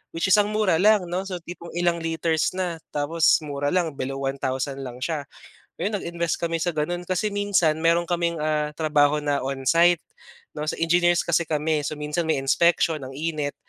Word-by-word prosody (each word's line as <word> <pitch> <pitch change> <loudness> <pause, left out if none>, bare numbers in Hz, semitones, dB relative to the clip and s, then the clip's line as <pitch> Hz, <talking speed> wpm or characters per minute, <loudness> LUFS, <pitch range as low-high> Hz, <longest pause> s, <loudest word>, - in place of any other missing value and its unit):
which 170 +3 0
is 210 - +7
ang 205 - +3
mura 195 -7 +2
lang, 210 0 +5
'no? 185 +2 -2
So 180 -3 -6
tipong 170 -1 -9
ilang 175 -1 +1
liters 165 0 -1
na, 180 -3 -2 0.2
tapos 160 +2 +3
mura 145 -1 -3
lang, 170 -1 0
below 135 +1 -3
one 135 0 -2
thousand 135 +1 -2
lang 125 -2 -7
siya. 150 -3 -3 0.5
Ayun 205 - -2
nag-invest 170 -2 -3
kami 165 -1 -1
sa 170 +2 -1
ganun 165 +3 -2
kasi 185 +4 -1
minsan, 200 -6 +2
meron 170 +1 +3
kaming, 170 -1 0
ah, 150 -1 0
trabaho 150 -2 +3
na 145 -1 0
onsite, 165 +6 +3 0.5
'no? 150 0 -4
Sa - - -4
engineers 175 +1 +3
kasi 170 0 +2
kami 150 0 0
so, 150 +1 -4
minsan 150 +3 -2
may 160 - +1
inspection, 165 +1 +2
ang 130 0 -7
init. 150 -1 -3
165 Hz, 190 wpm, -24 LUFS, 150-175 Hz, 0.5 s, is